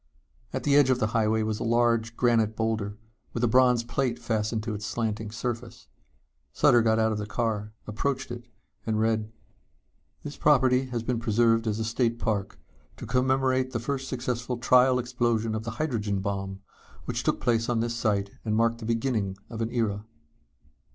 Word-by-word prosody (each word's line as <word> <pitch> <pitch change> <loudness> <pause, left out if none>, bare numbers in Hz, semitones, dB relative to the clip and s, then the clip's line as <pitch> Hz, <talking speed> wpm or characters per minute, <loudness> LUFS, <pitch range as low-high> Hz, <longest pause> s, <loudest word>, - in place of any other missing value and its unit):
At - - -3
the 140 -1 +3
edge 145 -2 +6
of 130 - +3
the 110 - +1
highway 110 -1 +2
was 110 -1 -2
a - - -2
large 115 0 +1
granite 115 -3 +2
boulder 110 -2 -2 0.4
with 120 - -2
a - - +5
bronze 125 0 +4
plate 120 0 -1
fastened 110 -2 -1
to 110 -1 -3
its 105 0 -6
slanting 110 -1 -2
surface. 115 +1 -5 0.6
Sutter 120 - +5
got 110 -1 +2
out 110 0 +2
of 105 - -2
the 105 - -4
car, 105 -2 -2
approached 135 +5 -2
it 120 0 -7 0.4
and 110 -1 -1
read: 110 -1 0 0.9
_This 145 - -7
property 130 -3 +4
has 120 -3 -4
been 120 0 -1
preserved 115 0 +2
as 105 -1 0
a 110 - -2
State 115 +1 0
Park 105 -4 -2 0.4
to - - -7
commemorate 130 +1 +1
the 120 - -1
first 135 +3 -3
successful 125 -1 -3
trial 125 +2 +4
explosion 120 -3 0
of 110 0 -3
the 115 - -3
Hydrogen 110 -10 -1
Bomb 95 0 -4 0.4
which - - -2
took - - 0
place 115 -1 +1
on 120 -2 +1
this 115 +1 -1
site 100 -4 0
and 110 -1 -1
marked 115 +1 +2
the 110 - -7
beginning 115 -4 -1
of 115 -1 -5
an 115 - -1
era. 110 -4 -1
115 Hz, 180 wpm, -27 LUFS, 110-125 Hz, 0.9 s, edge